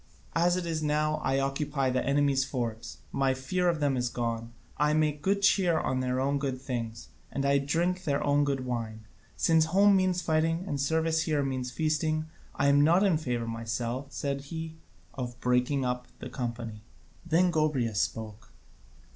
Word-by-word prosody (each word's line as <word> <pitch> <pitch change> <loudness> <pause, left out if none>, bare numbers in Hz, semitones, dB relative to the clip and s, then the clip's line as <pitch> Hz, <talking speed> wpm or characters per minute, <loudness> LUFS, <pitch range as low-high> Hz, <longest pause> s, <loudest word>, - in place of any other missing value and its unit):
As 175 +2 +3
it 180 - -3
is 160 -2 -2
now, 150 0 +1
I 135 0 +1
occupy 135 0 0
the 130 0 0
enemy's 140 -1 +2
forts, 120 -4 -4
my 135 -1 +1
fear 180 +7 0
of 165 -2 0
them 145 -2 +1
is 125 -1 0
gone, 115 -1 -3 0.3
I 150 +1 +2
make 150 -1 +1
good 200 +4 +1
cheer 185 -4 +4
on 130 0 -1
their 130 0 -1
own 140 +2 +1
good 135 -2 -2
things, 115 -4 -5 0.2
and 140 - -2
I 140 0 +4
drink 170 +6 0
their 140 -4 0
own 145 0 +3
good 135 -2 -1
wine. 110 -3 -4 0.3
Since 160 - +4
home 195 +4 +5
means 185 -1 +2
fighting 165 +2 +1
and 145 -6 -2
service 160 +2 +1
here 150 -3 0
means 130 -2 -2
feasting, 155 +2 0 0.3
I 145 - 0
am 140 +1 +5
not 170 +6 +5
in 185 -6 +3
favour 120 -6 -2
myself," 115 +3 -3
said 140 -1 -3
he, 160 +1 -6 0.4
"of 120 -2 -6
breaking 125 +2 +1
up 125 0 -2
the - - -8
company." 115 -3 -5 0.4
Then 170 +2 +3
Gobryas 135 -9 +1
spoke. 110 -1 -5
140 Hz, 175 wpm, -29 LUFS, 125-160 Hz, 0.4 s, home